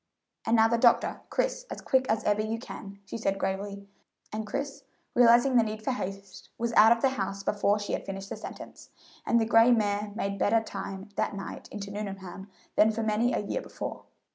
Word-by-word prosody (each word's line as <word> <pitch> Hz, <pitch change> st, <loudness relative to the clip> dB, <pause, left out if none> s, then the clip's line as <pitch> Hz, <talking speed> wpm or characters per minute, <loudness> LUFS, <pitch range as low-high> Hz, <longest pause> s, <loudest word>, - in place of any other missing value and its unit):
"And 225 Hz, -, +4 dB
now 225 Hz, 0 st, +6 dB
the 235 Hz, +1 st, +1 dB
doctor, 235 Hz, -1 st, +3 dB
Chris, -, -, -1 dB
as -, -, -6 dB
quick 260 Hz, -1 st, +1 dB
as 220 Hz, 0 st, +1 dB
ever 210 Hz, 0 st, +2 dB
you 220 Hz, +1 st, -2 dB
can," 200 Hz, -4 st, -9 dB
she 230 Hz, -, -6 dB
said 195 Hz, -3 st, 0 dB
gravely; 200 Hz, +1 st, -3 dB, 0.5 s
and 215 Hz, 0 st, -3 dB
Chris, 280 Hz, +5 st, -4 dB, 0.3 s
realizing 240 Hz, +2 st, +6 dB
the 230 Hz, -, +6 dB
need 215 Hz, 0 st, -5 dB
for 265 Hz, -, 0 dB
haste, 195 Hz, -5 st, -6 dB
was 235 Hz, 0 st, -2 dB
out 220 Hz, +1 st, +7 dB
of 235 Hz, -1 st, +3 dB
the 270 Hz, -, +5 dB
house 195 Hz, -5 st, -3 dB
before 205 Hz, +1 st, +2 dB
she 205 Hz, -1 st, -4 dB
had -, -, -3 dB
finished 195 Hz, 0 st, -6 dB
the -, -, -4 dB
sentence, -, -, -10 dB, 0.4 s
and 235 Hz, -, +4 dB
the 225 Hz, -, +2 dB
gray 225 Hz, +1 st, +6 dB
mare 210 Hz, -3 st, +1 dB
made 200 Hz, -2 st, -2 dB
better 225 Hz, +4 st, +4 dB
time 195 Hz, -2 st, -6 dB
that -, -, 0 dB
night 195 Hz, -, -7 dB
into 200 Hz, -1 st, -6 dB
Nuneham 195 Hz, -1 st, -6 dB, 0.3 s
than 215 Hz, -, +6 dB
for 225 Hz, +1 st, -3 dB
many 220 Hz, +3 st, +2 dB
a 205 Hz, -, -1 dB
year -, -, -2 dB
before. -, -, -6 dB
215 Hz, 205 wpm, -28 LUFS, 200-230 Hz, 0.5 s, out